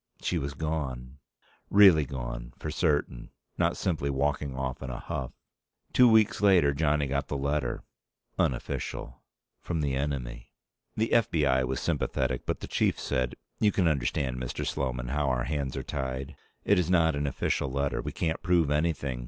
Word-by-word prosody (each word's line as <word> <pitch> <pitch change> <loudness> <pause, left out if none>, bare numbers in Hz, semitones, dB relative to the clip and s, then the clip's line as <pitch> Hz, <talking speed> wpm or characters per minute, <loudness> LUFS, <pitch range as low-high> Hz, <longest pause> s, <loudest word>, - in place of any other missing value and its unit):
She 90 - 0
was 70 -1 -4
gone. 70 -4 -4 0.5
Really 95 -7 +7
gone, - - -6
for 75 - -5
certain, 75 -7 0 0.3
not - - +2
simply 80 -6 -1
walking 70 0 -1
off 65 -1 -3
in 70 - -5
a - - -4
huff. - - -4 0.6
Two 125 -1 +7
weeks 110 -2 +4
later, 90 -8 +5
Johnny 75 0 +1
got 70 0 -1
the 70 - -2
letter 70 -2 -1 0.6
unofficial 60 -3 -2 0.4
from 85 -3 -2
the 70 -2 0
Enemy. 65 -4 -3 0.5
The 110 +1 0
F.B.I. 75 - +3
was 65 0 -2
sympathetic, 65 -1 -1
but - - -2
the - - -5
Chief - - +1
said, 65 -1 -1 0.2
"You 105 - +4
can 95 -4 +2
understand, 65 -3 0
Mr. 65 -1 -4
Sloman, 60 -2 -2
how 75 +1 0
our 60 -2 0
hands 70 0 -2
are 65 - -3
tied. 65 +2 -4 0.3
It 100 -2 +4
is 90 -2 0
not 80 -4 +3
an 70 0 -1
official 70 0 -1
letter. 70 +1 -1
We - - -4
can't 80 -1 -2
prove 85 -4 +2
anything. 75 -4 0
70 Hz, 165 wpm, -28 LUFS, 65-80 Hz, 0.6 s, Really